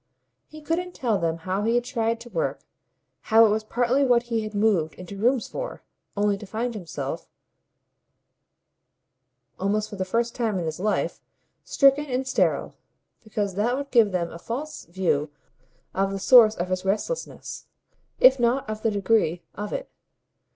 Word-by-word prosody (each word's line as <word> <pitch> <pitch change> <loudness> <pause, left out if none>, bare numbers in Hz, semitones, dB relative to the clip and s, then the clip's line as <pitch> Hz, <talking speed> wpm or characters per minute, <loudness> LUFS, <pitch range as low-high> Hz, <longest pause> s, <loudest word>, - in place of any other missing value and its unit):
He 310 0 -12
couldn't 350 +4 -2
tell 230 -6 0
them 165 -1 -1
how 185 +4 -2
he 225 +3 +1
had 240 - +2
tried 230 -2 -1
to 240 - -10
work, 170 -7 -2 0.7
how 225 0 +7
it - - +4
was 215 +1 0
partly 245 +5 +1
what 245 -3 +4
he 225 - +2
had 215 -1 -6
moved 200 -7 +2
into 180 +2 -9
rooms 240 +4 +1
for, - - -6 0.3
only 205 -1 +1
to 210 - -9
find 230 +4 -2
himself, 160 -9 -6 2.3
almost 210 +3 0
for 205 - -7
the 190 - -1
first 235 +5 -1
time 225 -5 -1
in 175 - -2
his 160 +1 -4
life, 210 +3 -1 0.4
stricken 275 +1 +3
and 260 0 -2
sterile; 260 - +1 0.5
because 205 -2 -2
that 225 +7 0
would 280 0 -5
give 225 -5 +5
them 175 -2 -1
a 170 - -9
false 275 - -5
view 170 -4 0 0.6
of 195 0 +1
the 195 - -3
source 215 +2 +7
of 175 +1 -3
his 185 0 -1
restlessness, 210 - -3 0.5
if 260 +1 +7
not 240 +2 +1
of 215 0 -5
the 225 - +2
degree 200 -5 +1
of 210 +1 -5
it. - - -4
215 Hz, 165 wpm, -25 LUFS, 190-245 Hz, 2.3 s, how